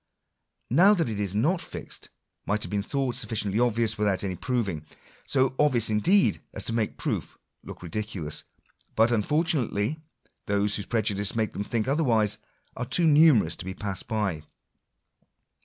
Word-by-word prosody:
Now 195 Hz, +4 st, +6 dB
that 165 Hz, -, 0 dB
it 105 Hz, -2 st, -4 dB
is 100 Hz, -1 st, -2 dB
not 165 Hz, -, +1 dB
fixed, -, -, -7 dB, 0.4 s
might 105 Hz, +1 st, 0 dB
have -, -, -4 dB
been 100 Hz, -1 st, 0 dB
thought 135 Hz, +3 st, -2 dB
suffi 115 Hz, -3 st, -1 dB
ciently 105 Hz, +4 st, +1 dB
obvious 115 Hz, -2 st, +1 dB
without 105 Hz, -2 st, +1 dB
any 95 Hz, -2 st, -2 dB
proving 100 Hz, -8 st, -2 dB, 0.2 s
— -, -, -26 dB
so 130 Hz, -1 st, +2 dB
obvious 125 Hz, -7 st, +3 dB
indeed 180 Hz, -, +3 dB
as -, -, -1 dB
to 115 Hz, -, -2 dB
make 115 Hz, -2 st, -1 dB
proof -, -, -3 dB, 0.3 s
look -, -, -10 dB
ridiculous. 90 Hz, -4 st, -3 dB, 0.5 s
But, 115 Hz, +2 st, +4 dB
unfortunately, 145 Hz, 0 st, 0 dB, 0.5 s
those 100 Hz, 0 st, +1 dB
whose 100 Hz, -, -3 dB
prejudices 105 Hz, -3 st, 0 dB
make 110 Hz, -1 st, -1 dB
them 100 Hz, -, -3 dB
think 115 Hz, +2 st, -2 dB
otherwise 115 Hz, -8 st, +2 dB, 0.4 s
are 125 Hz, -, -3 dB
too 150 Hz, +8 st, +2 dB
numerous 145 Hz, -, +5 dB
to -, -, -7 dB
be 95 Hz, 0 st, -5 dB
passed 95 Hz, -3 st, -4 dB
by. 105 Hz, -8 st, -1 dB
110 Hz, 160 wpm, -26 LUFS, 100-130 Hz, 0.5 s, Now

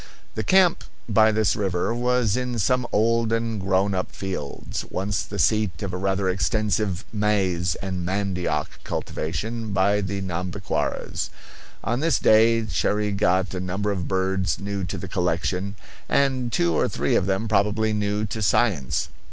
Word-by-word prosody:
The -, -, -2 dB
camp 185 Hz, -3 st, +4 dB, 0.2 s
by 110 Hz, 0 st, +5 dB
this 110 Hz, 0 st, +2 dB
river 95 Hz, 0 st, 0 dB
was 125 Hz, -3 st, +1 dB
in 125 Hz, -1 st, -2 dB
some 125 Hz, +4 st, +1 dB
old 115 Hz, +1 st, +2 dB
and 115 Hz, -2 st, -1 dB
grown 95 Hz, +1 st, +1 dB
up 90 Hz, 0 st, -2 dB
fields, 95 Hz, -8 st, -5 dB
once 95 Hz, +1 st, -1 dB
the 100 Hz, -, -6 dB
seat 105 Hz, +2 st, +1 dB
of 95 Hz, -3 st, -3 dB
a -, -, -2 dB
rather 95 Hz, +1 st, 0 dB
extensive 100 Hz, -1 st, 0 dB
maize 95 Hz, -6 st, +1 dB
and 95 Hz, -2 st, -3 dB
mandioc 95 Hz, -1 st, -2 dB
cultivation 110 Hz, +7 st, -3 dB
by 100 Hz, +2 st, +3 dB
the 100 Hz, 0 st, -3 dB
Nhambiquaras. 90 Hz, -1 st, -2 dB, 0.5 s
On 120 Hz, +4 st, 0 dB
this 160 Hz, -1 st, +2 dB
day 115 Hz, +1 st, +5 dB
Cherrie 105 Hz, 0 st, 0 dB
got 95 Hz, -1 st, +1 dB
a 95 Hz, -, -3 dB
number 95 Hz, +3 st, -2 dB
of 95 Hz, -3 st, -3 dB
birds 95 Hz, 0 st, 0 dB
new 100 Hz, -1 st, -4 dB
to 90 Hz, -, -4 dB
the -, -, -6 dB
collection, 90 Hz, +3 st, -1 dB, 0.3 s
and 130 Hz, -3 st, +1 dB
two 85 Hz, -5 st, +2 dB
or -, -, +2 dB
three -, -, 0 dB
of 90 Hz, -, +2 dB
them 100 Hz, +3 st, 0 dB
probably 105 Hz, +1 st, +2 dB
new 105 Hz, 0 st, 0 dB
to 110 Hz, +2 st, -4 dB
science. 95 Hz, -, +1 dB
100 Hz, 155 wpm, -24 LUFS, 95-110 Hz, 0.5 s, by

